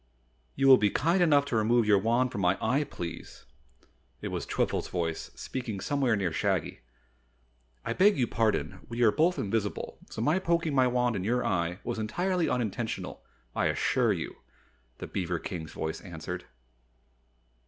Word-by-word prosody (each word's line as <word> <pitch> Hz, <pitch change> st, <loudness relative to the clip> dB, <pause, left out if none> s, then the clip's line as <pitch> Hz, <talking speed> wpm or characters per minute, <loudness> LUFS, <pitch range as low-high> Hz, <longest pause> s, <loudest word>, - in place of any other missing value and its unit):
"You 135 Hz, -, +2 dB
will 130 Hz, -1 st, +9 dB
be 105 Hz, -, +3 dB
kind 170 Hz, -, +2 dB
enough 145 Hz, -4 st, +5 dB
to 140 Hz, -, -2 dB
remove 115 Hz, +2 st, +3 dB
your 105 Hz, -2 st, +5 dB
wand 120 Hz, +5 st, +1 dB
from 100 Hz, -, -3 dB
my 90 Hz, +1 st, +3 dB
eye, 130 Hz, +6 st, +1 dB
please!" 85 Hz, -, -8 dB, 0.7 s
It -, -, -4 dB
was -, -, -4 dB
Twiffle's -, -, 0 dB
voice 85 Hz, -2 st, -3 dB
speaking 120 Hz, -6 st, -5 dB
somewhere 135 Hz, -1 st, +1 dB
near 95 Hz, -4 st, -1 dB
Shaggy. -, -, -1 dB, 1.1 s
"I -, -, -1 dB
beg 200 Hz, 0 st, +4 dB
your 125 Hz, -, +3 dB
pardon, 110 Hz, -4 st, 0 dB
we 120 Hz, +1 st, 0 dB
are 110 Hz, -, +6 dB
both 175 Hz, +7 st, +2 dB
invisible, 105 Hz, 0 st, -2 dB
so -, -, -7 dB
my 155 Hz, +8 st, +3 dB
poking 170 Hz, -4 st, 0 dB
my 130 Hz, -2 st, +4 dB
wand 125 Hz, -1 st, +1 dB
in 90 Hz, -, -2 dB
your 125 Hz, +4 st, 0 dB
eye 90 Hz, +1 st, -1 dB
was -, -, -3 dB
entirely 175 Hz, -, 0 dB
unintentional, 115 Hz, -1 st, -3 dB, 0.3 s
I -, -, +2 dB
assure -, -, +2 dB
you," -, -, -3 dB, 0.6 s
the -, -, -6 dB
beaver 90 Hz, -2 st, -2 dB
King's 80 Hz, -2 st, -6 dB
voice 80 Hz, 0 st, -4 dB
answered. 90 Hz, 0 st, -6 dB
115 Hz, 165 wpm, -29 LUFS, 95-135 Hz, 1.1 s, will